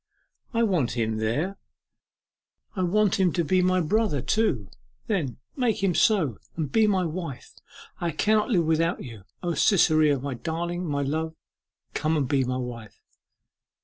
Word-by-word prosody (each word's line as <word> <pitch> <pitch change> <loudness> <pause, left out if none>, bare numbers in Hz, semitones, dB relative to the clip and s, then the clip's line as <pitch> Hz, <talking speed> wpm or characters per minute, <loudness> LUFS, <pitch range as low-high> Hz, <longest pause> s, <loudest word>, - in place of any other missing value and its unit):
I 230 -2 +1
want 175 - +1
him 110 -1 0
there: 145 - -1 1.2
I 190 - -1
want 200 +3 +2
him 185 -2 +3
to 170 - +1
be 185 +4 +2
my 185 0 +2
brother, 205 -2 +1
too. 130 - 0 0.3
Then 160 - -1 0.2
make 230 -6 0
him 190 -3 +3
so, 165 - +2 0.2
and 150 -4 -2
be 220 -1 +4
my 190 -3 +2
wife! 165 -5 -6 0.5
I 170 - -1
cannot 215 - +1
live 180 -8 +2
without 165 +2 +1
you. 110 -7 -10 0.2
O 175 -1 0
Cytherea, 155 -3 +4
my 135 +1 -4
darling, 170 +6 -3
my 140 -1 -1
love, 160 +3 -2 0.6
come 155 +1 0
and 140 -3 0
be 135 0 +2
my 125 0 -2
wife! 120 -4 -7
165 Hz, 155 wpm, -26 LUFS, 140-190 Hz, 1.2 s, be